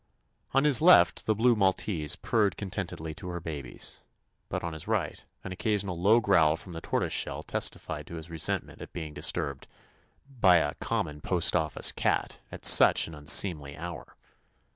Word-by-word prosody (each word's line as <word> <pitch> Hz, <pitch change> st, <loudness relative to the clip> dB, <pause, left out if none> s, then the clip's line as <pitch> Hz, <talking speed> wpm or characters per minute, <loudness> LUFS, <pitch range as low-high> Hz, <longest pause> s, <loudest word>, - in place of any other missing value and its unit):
On 135 Hz, -, +3 dB
his 150 Hz, -1 st, +4 dB
left 180 Hz, +3 st, +5 dB
the 110 Hz, -, +2 dB
blue 120 Hz, +3 st, +3 dB
Maltese 95 Hz, -5 st, 0 dB
purred 105 Hz, -4 st, 0 dB
contentedly 90 Hz, -5 st, -5 dB
to 85 Hz, -, -9 dB
her 90 Hz, -1 st, -5 dB
babies, 70 Hz, -7 st, -6 dB, 0.5 s
but -, -, -4 dB
on 85 Hz, -1 st, -4 dB
his 80 Hz, -, -6 dB
right -, -, -2 dB, 0.2 s
an 95 Hz, -, -7 dB
occasional 100 Hz, -1 st, -2 dB
low 100 Hz, +7 st, +4 dB
growl 80 Hz, -8 st, +3 dB
from 90 Hz, +1 st, -9 dB
the 80 Hz, -, -7 dB
Tortoise -, -, -2 dB
shell -, -, -2 dB
testified -, -, -3 dB
to 85 Hz, -, -8 dB
his 80 Hz, 0 st, -8 dB
re 85 Hz, -1 st, -8 dB
sentment -, -, -2 dB
at -, -, -10 dB
being 80 Hz, -3 st, -6 dB
disturbed 70 Hz, -2 st, -2 dB, 0.6 s
by 110 Hz, -10 st, +3 dB
"a 75 Hz, -4 st, +1 dB
common 75 Hz, 0 st, -3 dB
postoffice 85 Hz, -3 st, +1 dB
cat" -, -, -2 dB
at -, -, -5 dB
such -, -, +7 dB
an 80 Hz, -, -10 dB
un 75 Hz, -1 st, -12 dB
seemly 75 Hz, -6 st, +3 dB
hour. 85 Hz, +1 st, -8 dB
85 Hz, 170 wpm, -28 LUFS, 80-100 Hz, 0.6 s, such